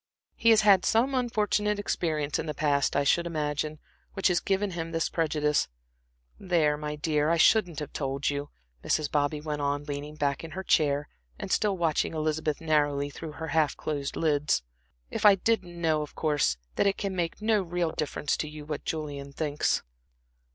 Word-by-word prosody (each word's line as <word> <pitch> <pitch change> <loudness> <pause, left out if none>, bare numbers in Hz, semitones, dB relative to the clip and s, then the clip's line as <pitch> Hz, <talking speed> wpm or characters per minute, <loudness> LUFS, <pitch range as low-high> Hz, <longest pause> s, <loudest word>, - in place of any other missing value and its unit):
He 230 - +2
has 220 -1 +7
had 200 -4 +6
some 245 +5 +2
unfortunate 210 -4 +1
experience 155 -7 -1
in 160 - -3
the 150 - -3
past, 145 -2 +1
I 140 - +3
should 170 +4 +2
imagine, 150 -1 -2 0.4
which 195 -1 +2
has 175 - +2
given 195 0 0
him 165 -1 -4
this 165 0 0
prejudice. 150 -2 +1 0.7
There, 165 -6 +2
my 150 0 -4
dear, 150 0 +1
I 170 - +3
shouldn't 180 -2 +4
have 150 -1 -5
told 135 -1 -2
you," 145 0 -2 0.3
Mrs. 155 -2 0
Bobby 145 0 +1
went 150 -1 -3
on, 145 0 -1
leaning 145 +1 -6
back 140 -1 -1
in 160 -1 -8
her 190 - -3
chair, 145 -5 +2 0.3
and - - -6
still 205 -3 +2
watching 165 -1 0
Elizabeth 155 -1 -1
narrowly 145 -3 +1
through 155 +2 -8
half 160 -1 0
closed 145 -2 -3
lids, 150 - +1 0.5
"if - - -3
I 205 -2 +8
didn't 180 -4 -1
know, 160 -2 +2
of 150 - -7
course, 145 - +1 0.2
that - - +3
it 195 - +1
can 195 -2 -3
make 170 -2 -2
no 215 -1 +2
real 175 -2 -1
difference 150 -2 -2
to 150 - -3
you 150 -1 -9
what 150 -1 -5
Julian 145 -3 -4
thinks." 150 0 0
155 Hz, 180 wpm, -28 LUFS, 145-175 Hz, 0.7 s, I